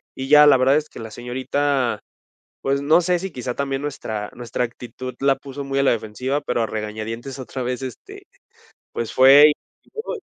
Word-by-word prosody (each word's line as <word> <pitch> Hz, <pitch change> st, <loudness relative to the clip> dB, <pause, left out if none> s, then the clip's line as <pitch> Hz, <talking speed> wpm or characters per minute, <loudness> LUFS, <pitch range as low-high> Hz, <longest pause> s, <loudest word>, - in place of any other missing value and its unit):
y 130 Hz, -, -5 dB
ya, 150 Hz, 0 st, +8 dB
la 140 Hz, -, +7 dB
verdad 130 Hz, +2 st, +4 dB
es 155 Hz, 0 st, -3 dB
que -, -, -11 dB
la 110 Hz, -1 st, -8 dB
señorita, 130 Hz, +2 st, -1 dB, 0.6 s
pues, 140 Hz, +1 st, 0 dB
no 155 Hz, +5 st, +4 dB
sé 180 Hz, 0 st, +1 dB
si 190 Hz, +1 st, -5 dB
quizá 125 Hz, -3 st, -5 dB
también 135 Hz, -1 st, -2 dB
nuestra 110 Hz, -7 st, -5 dB
nuestra 120 Hz, 0 st, -3 dB
actitud 125 Hz, +1 st, -8 dB
la 135 Hz, 0 st, +3 dB
puso 140 Hz, 0 st, -8 dB
muy 135 Hz, 0 st, -1 dB
a -, -, +3 dB
la 135 Hz, -, +4 dB
defensiva, 120 Hz, +5 st, -2 dB
pero 120 Hz, -4 st, -1 dB
a -, -, -1 dB
regañadientes 110 Hz, +5 st, -5 dB
otra 130 Hz, 0 st, -6 dB
vez, 125 Hz, +1 st, -3 dB
este, 130 Hz, -3 st, -9 dB, 0.7 s
pues, 115 Hz, -, -4 dB
fue 135 Hz, +3 st, +8 dB
y -, -, +3 dB, 0.4 s
y -, -, -27 dB
luego, 450 Hz, +2 st, -5 dB
130 Hz, 200 wpm, -22 LUFS, 120-140 Hz, 0.7 s, ya